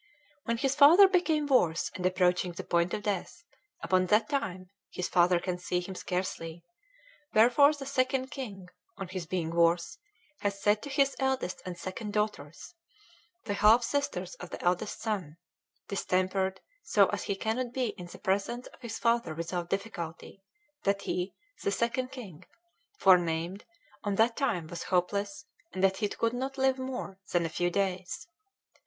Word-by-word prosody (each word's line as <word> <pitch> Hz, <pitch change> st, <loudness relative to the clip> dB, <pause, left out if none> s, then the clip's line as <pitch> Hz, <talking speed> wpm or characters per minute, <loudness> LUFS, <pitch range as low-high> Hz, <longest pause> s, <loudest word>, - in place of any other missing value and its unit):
"When 230 Hz, 0 st, 0 dB
his 270 Hz, +3 st, +1 dB
father 315 Hz, +8 st, +8 dB
became 345 Hz, -5 st, +2 dB
worse 180 Hz, -, +2 dB
and 180 Hz, -, -6 dB
approaching 180 Hz, -1 st, +1 dB
the -, -, -6 dB
point 170 Hz, 0 st, +1 dB
of 210 Hz, -, -6 dB
death, 205 Hz, -, -3 dB, 0.4 s
upon 185 Hz, 0 st, +2 dB
that 215 Hz, +3 st, +3 dB
time 185 Hz, -10 st, -3 dB, 0.2 s
his 180 Hz, -, -3 dB
father 175 Hz, -1 st, +4 dB
can 180 Hz, 0 st, -3 dB
see 180 Hz, 0 st, -1 dB
him 180 Hz, +2 st, -6 dB
scarcely; 175 Hz, -3 st, -4 dB, 0.7 s
wherefore 245 Hz, +6 st, +6 dB
the 280 Hz, -2 st, -7 dB
Second 260 Hz, -1 st, 0 dB
King, 205 Hz, -10 st, -7 dB, 0.3 s
on 195 Hz, -3 st, -6 dB
his 185 Hz, -3 st, -5 dB
being 165 Hz, -3 st, -2 dB
worse, 170 Hz, -, +2 dB, 0.4 s
has 200 Hz, -1 st, -2 dB
said 210 Hz, +1 st, +2 dB
to 285 Hz, -, -7 dB
his 275 Hz, 0 st, +2 dB
eldest 265 Hz, -8 st, -1 dB
and 180 Hz, -1 st, -5 dB
second 205 Hz, +4 st, -5 dB
daughters, 210 Hz, -, -3 dB, 0.7 s
the 205 Hz, -, -2 dB
half 215 Hz, +4 st, +5 dB
sisters 235 Hz, -9 st, -2 dB
of 180 Hz, -, -8 dB
the -, -, -7 dB
eldest 180 Hz, +3 st, 0 dB
son, 190 Hz, -9 st, -3 dB, 0.5 s
distempered 190 Hz, 0 st, 0 dB, 0.2 s
so 205 Hz, -, +4 dB
as 205 Hz, -, -3 dB
he 200 Hz, -, -1 dB
cannot 235 Hz, +5 st, -2 dB
be 255 Hz, -2 st, -1 dB
in 180 Hz, -3 st, -8 dB
the -, -, -11 dB
presence 200 Hz, +6 st, -1 dB
of -, -, -15 dB
his 225 Hz, -2 st, -5 dB
father 230 Hz, -9 st, +1 dB
without 170 Hz, +1 st, -3 dB
difficulty, 195 Hz, -2 st, -5 dB, 0.4 s
that 200 Hz, -3 st, 0 dB
he 180 Hz, +2 st, -2 dB, 0.3 s
(the -, -, 0 dB
Second 235 Hz, +5 st, 0 dB
King) 190 Hz, -, -9 dB, 0.5 s
forenamed 175 Hz, 0 st, +3 dB, 0.4 s
on 205 Hz, -2 st, -1 dB
that 230 Hz, +3 st, +3 dB
time 215 Hz, -, 0 dB
was 170 Hz, +2 st, -7 dB
hopeless 200 Hz, +2 st, -1 dB, 0.3 s
and 185 Hz, -, -3 dB
that 190 Hz, 0 st, +4 dB
he 210 Hz, -1 st, 0 dB
could 230 Hz, +2 st, -1 dB
not 265 Hz, +2 st, -3 dB
live 265 Hz, 0 st, +2 dB
more 255 Hz, -7 st, -5 dB
than 175 Hz, -1 st, +2 dB
a -, -, -2 dB
few 175 Hz, +2 st, 0 dB
days. 185 Hz, -1 st, -2 dB
200 Hz, 165 wpm, -30 LUFS, 180-240 Hz, 0.7 s, father